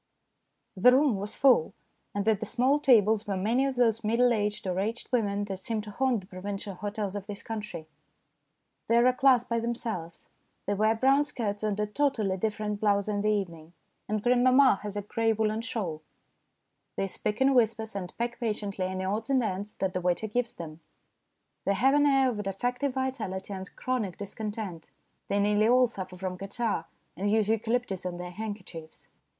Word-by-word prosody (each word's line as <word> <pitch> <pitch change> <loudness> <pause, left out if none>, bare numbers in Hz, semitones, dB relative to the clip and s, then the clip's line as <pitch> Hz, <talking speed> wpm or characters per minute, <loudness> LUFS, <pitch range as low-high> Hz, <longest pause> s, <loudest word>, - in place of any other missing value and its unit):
The 205 +7 +6
room 265 -4 +4
was 205 +2 -5
full, 255 - +4 0.4
and 205 +1 -1
at 220 -3 +3
the 220 - -3
small 255 +6 +2
tables 220 -5 +4
were 195 -2 -1
many 235 +8 +2
of 270 - -3
those 230 -2 +2
middle 235 +3 +3
aged 210 -2 -1
or 185 0 -1
aged 225 +5 -3
women 205 -5 +1
that 195 -2 -5
seem 220 +3 -3
to 210 0 -9
haunt 250 0 +1
the - - -15
provincial 195 +2 -6
hotels 205 +1 -4
of 200 -1 -5
this 205 -1 -6
country. 210 -7 -6 1.0
They 230 - +4
are 235 - +5
a 255 - +5
class 255 -2 +4
by 235 -2 -1
themselves. 225 -8 -4 0.4
They 205 - 0
wear 215 +2 +2
brown 270 +5 +4
skirts 225 -8 -3
and 210 -1 -1
a 210 - +2
totally 215 -4 0
different 210 0 -2
blouse 200 -1 +2
in 205 -1 -1
the 210 - +1
evening, 170 -6 -3 0.4
and 215 -1 -1
grandmamma 250 -1 +5
has 205 -1 -5
a 205 - -2
grey 225 +2 +1
woollen 220 0 0
shawl. 190 -9 -4 0.9
They - - 0
speak 210 +2 -3
in 270 +1 +4
whispers 225 -3 +1
and 180 -3 -4
peck 235 0 -3
patiently 210 -5 -2
any 185 0 -3
odds 215 +5 -2
and 265 -2 +3
ends 205 0 -3
that 190 -1 -2
the 185 - -2
waiter 180 +3 0
gives 240 +3 -1
them. 160 -2 -8 0.8
They 200 - +1
have 265 +7 +4
an 290 0 +4
air 270 -2 +4
of 210 -3 -4
defective 245 +7 -2
vitality 215 -8 -3
and 190 0 -8
chronic 230 -9 -2
discontent. 205 -4 -6 0.4
They 200 +1 +1
nearly 210 +1 +3
all 250 +2 +6
suffer 190 -6 -6
from 185 -1 -4
catarrh 210 +3 -2 0.3
and 200 +2 -1
use 215 0 +2
eucalyptus 225 -3 0
on 180 -1 -4
their 180 0 -6
handkerchiefs. 185 -6 -8
210 Hz, 185 wpm, -28 LUFS, 195-240 Hz, 1.0 s, The